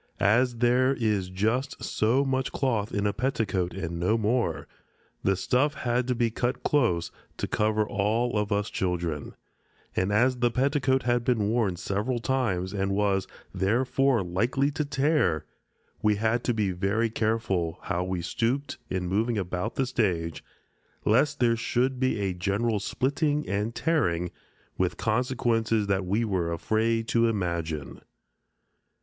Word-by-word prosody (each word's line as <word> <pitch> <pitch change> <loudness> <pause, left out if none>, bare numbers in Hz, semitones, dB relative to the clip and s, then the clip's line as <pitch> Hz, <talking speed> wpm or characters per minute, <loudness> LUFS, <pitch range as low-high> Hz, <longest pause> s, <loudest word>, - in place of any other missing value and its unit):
As 120 +5 +3
there 125 +3 +3
is 105 -6 0
just 110 +9 -1
so 125 +6 +1
much 130 -1 -1
cloth 115 -6 0
in 100 0 -1
a 105 - +1
petticoat 110 -8 -1
and 85 -3 -4
no 95 +6 +2
more, 105 - 0 0.5
the 95 - +2
stuff 135 +10 +1
had 120 0 0
to 125 - +1
be 115 -1 +1
cut 120 +3 -2
close 95 - +1 0.3
to - - -2
cover 110 0 +1
all 110 +5 0
of 105 0 0
us 100 0 0
children, 85 -5 -2 0.6
and 95 +2 +1
as 125 +5 +3
the 120 0 +2
petticoat 130 +1 +1
had 120 -1 +1
been 110 -5 +1
worn 110 -5 +1
several 105 +8 -2
times 115 -7 -1
and 100 -1 -1
was, 100 -2 +1 0.3
therefore, 125 +3 +2
likely 120 +11 0
to 150 +1 -1
tear, 140 - +1 0.6
we 105 -1 +3
had 110 +3 0
to 120 - +2
be 105 -3 +1
very 100 +5 0
careful 100 -7 0
how 90 - -1
we 90 -2 -3
stooped 120 +10 -1
in 95 -1 -2
moving 110 +5 0
about 95 +3 -3
the 135 - +1
stage, 90 -10 -1 0.6
lest 135 +7 +3
there 120 -1 +3
should 125 +3 0
be 130 -4 +1
a 95 -2 -1
general 100 +5 0
splitting 145 - 0
and 105 +3 -2
tearing, 90 - 0 0.5
with 90 -1 0
consequences 115 -2 +1
that 95 -2 0
we 105 +5 +1
were 90 -5 -1
afraid 110 +6 0
to 115 0 +3
imagine. 85 -8 -3
110 Hz, 150 wpm, -27 LUFS, 95-125 Hz, 0.6 s, As